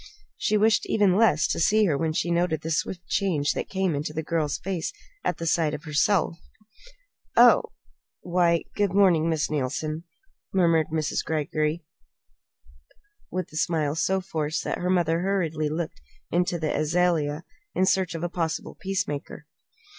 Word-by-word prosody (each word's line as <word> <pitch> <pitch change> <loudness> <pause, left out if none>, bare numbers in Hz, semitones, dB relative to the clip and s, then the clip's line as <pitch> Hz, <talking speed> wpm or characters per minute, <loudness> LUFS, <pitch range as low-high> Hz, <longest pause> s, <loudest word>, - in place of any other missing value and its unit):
She 215 - +1
wished 215 +1 +3
even 200 -4 +3
less 200 -8 +4
to - - -1
see 215 +6 +4
her 160 -7 +2
when 160 +2 0
she 170 +2 -1
noted 170 -2 +1
the 160 - -4
swift 175 +3 -2
change 160 -8 +1
that - - -4
came 190 -7 0
to 150 0 -5
the 160 - -2
girl's 155 -2 -1
face 185 -3 -3 0.3
at - - -1
sight 160 -2 +1
of 150 - -9
herself. 165 +3 +1 1.0
"Oh! - - +8 0.6
Why 175 -1 +2
good 205 -3 +1
morning, 175 -5 +4
Miss 155 -2 0
Neilson," 155 +3 -2 0.5
murmured 170 -4 +3
Miss 155 -1 -1
Greggory 155 +1 -1 1.4
with 185 -4 -4
a - - -5
smile 155 -3 0
so 190 +4 0
forced 155 -4 -2
that - - -3
her 180 - -1
mother 170 -3 +2
hurriedly 170 -5 0
looked 160 - -4 0.5
to 175 - -1
the 155 -2 -2
azalea 155 -1 +1 0.3
in 185 - +3
search 190 -2 +1
of 165 - -4
a - - +1
possible 165 -2 -3
peacemaker. 185 -7 -3
165 Hz, 155 wpm, -26 LUFS, 155-185 Hz, 1.4 s, Oh